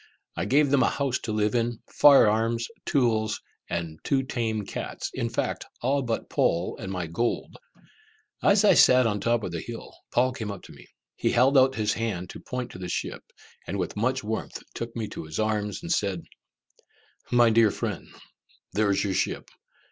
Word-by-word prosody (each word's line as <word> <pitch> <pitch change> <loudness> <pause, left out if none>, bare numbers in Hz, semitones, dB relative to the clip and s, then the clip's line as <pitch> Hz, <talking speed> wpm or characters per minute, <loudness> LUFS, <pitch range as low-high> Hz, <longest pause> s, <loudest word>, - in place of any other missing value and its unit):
I 85 - -2
gave 140 +5 +3
them 140 -2 +4
a - - +4
house 135 -3 -1
to 115 - -5
live 105 0 +1
in, 120 -1 0 0.2
fire 140 -6 +7
arms, 115 +2 +1 0.2
tools, 110 -6 +1 0.3
and 85 -1 -2
my 80 - -15
two 135 -1 +1
tame 115 -5 -2
cats, - - -5
in - - -2
fact, - - -2 0.2
all 140 +3 +2
but 120 -3 -2
Poll 85 +2 +1
and 95 -3 -5
my 90 -2 -3
gold. 100 +9 -2 0.9
As 200 +1 +4
I - - +7
sat 125 -1 +6
on 105 -2 0
the - - -8
top 120 -1 +2
of 90 - -3
the 85 - -3
hill, 115 -1 -8 0.2
Paul 130 +1 +3
came 110 -4 -5
up 100 - -8
to - - -13
me. - - -15 0.3
He - - +1
held 130 +4 +4
out 130 0 +5
his 105 -2 +1
hand 100 -6 -3
to - - -9
point 125 -1 -5
to - - -10
the 90 -1 -5
ship, - - -3 0.4
and 100 - -3
with 90 -3 -3
much 130 +4 0
warmth 110 +1 -4
took 115 0 -6
me 115 -2 -3
to - - -7
his 80 +1 -6
arms, 110 +3 -1
and 170 - -4
said, 100 - 0 1.1
"My 120 -2 +5
dear 110 -1 +5
friend, - - -4 0.7
there 105 0 +2
is 100 0 +2
your 100 -2 -1
ship! - - -2
115 Hz, 200 wpm, -26 LUFS, 100-125 Hz, 1.1 s, fire